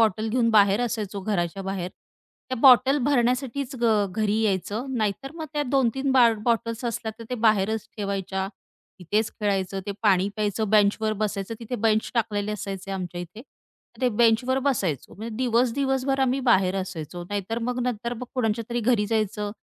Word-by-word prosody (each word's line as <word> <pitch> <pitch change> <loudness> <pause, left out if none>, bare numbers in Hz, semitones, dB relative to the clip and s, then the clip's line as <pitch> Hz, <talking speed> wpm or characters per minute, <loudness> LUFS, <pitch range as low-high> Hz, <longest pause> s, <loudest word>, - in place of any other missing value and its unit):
Bottle 220 0 +2
घेऊन 230 0 +2
बाहेर 205 0 +5
असायचो 210 -4 -3
घराच्या 190 -2 -2
बाहेर. 185 -2 -3 0.6
त्या 255 - -1
बॉटल 265 +1 +7
भरण्यासाठीच 260 +1 0
ग 215 -4 +3
घरी 215 +2 0
यायचं. 210 +4 -1
नाहीतर 220 +6 -2
मग 320 -2 -6
त्या 295 -1 0
2-3 270 0 +1
बा 250 -3 +7 0.2
बॉटल्स 230 0 0
असल्या, 225 -1 -3
तर 230 - -8
ते - - 0
बाहेरच 215 0 +2
ठेवायच्या. 195 -2 -2 0.5
तिथेच 210 +5 0
खेळायचं, 195 -2 -1
ते 200 - -2
पाणी 195 -2 +3
प्यायचं, 210 0 -1
बेंचवर 215 +1 +3
बसायचं. 200 +1 -3
तिथे 235 +2 -4
बेंच 220 0 +1
टाकलेले 210 -3 0
असायचे 195 -2 -5
आमच्या 180 -2 -4
इथे, 175 +5 -9
मग 265 - -23
ते 250 - +4
बेंचवर 240 +3 +3
बसायचो. 185 - -1
म्हणजे 220 +2 -7
दिवस 245 -1 +2
दिवसभर 270 -1 0
आम्ही 265 0 +2
बाहेर 190 -2 +3
असायचो. 175 -2 -6
नाहीतर 205 +3 -2
मग 250 0 -2
नंतर 235 -1 -2
मग 250 +2 -6
कोणाच्यातरी 230 0 -1
घरी 210 -4 +2
जायचं, 210 -1 -1
220 Hz, 160 wpm, -25 LUFS, 200-245 Hz, 0.6 s, बॉटल